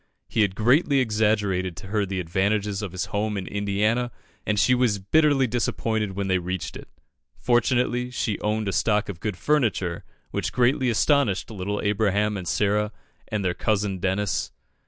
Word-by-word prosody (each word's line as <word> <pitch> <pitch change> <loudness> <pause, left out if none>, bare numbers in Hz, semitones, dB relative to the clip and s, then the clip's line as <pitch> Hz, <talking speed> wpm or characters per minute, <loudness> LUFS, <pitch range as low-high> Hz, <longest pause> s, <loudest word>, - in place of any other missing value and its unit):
He 110 - 0
had 100 -3 +1
greatly 135 - +3
exaggerated 105 -6 +1
to - - -9
her 105 -1 0
the 95 0 -3
advantages 100 +4 0
of 100 -4 -4
his 95 0 -3
home 105 0 -1
in 95 - -4
Indiana, 105 +5 0 0.4
and 105 - +1
she 115 +5 +4
was 125 -4 +2
bitterly 140 +7 +3
disappointed 110 -3 -1
when 100 0 -2
they 95 -1 +2
reached 90 +1 -4
it. - - -9 0.5
Fortunately, 125 0 +1
she 115 -4 -2
owned 105 0 -1
a 100 - -1
stock 105 -2 +1
of 90 -4 -6
good 105 -3 -3
furniture, 110 - 0 0.3
which - - -2
greatly 125 +1 +2
astonished 115 -2 +2
little 105 0 -3
Abraham 105 0 +1
and 90 -3 -5
Sarah 105 +2 +1 0.4
and 105 -2 -2
their 90 - +1
cousin 100 0 -1
Dennis. 95 +2 -1
105 Hz, 165 wpm, -25 LUFS, 95-115 Hz, 0.5 s, she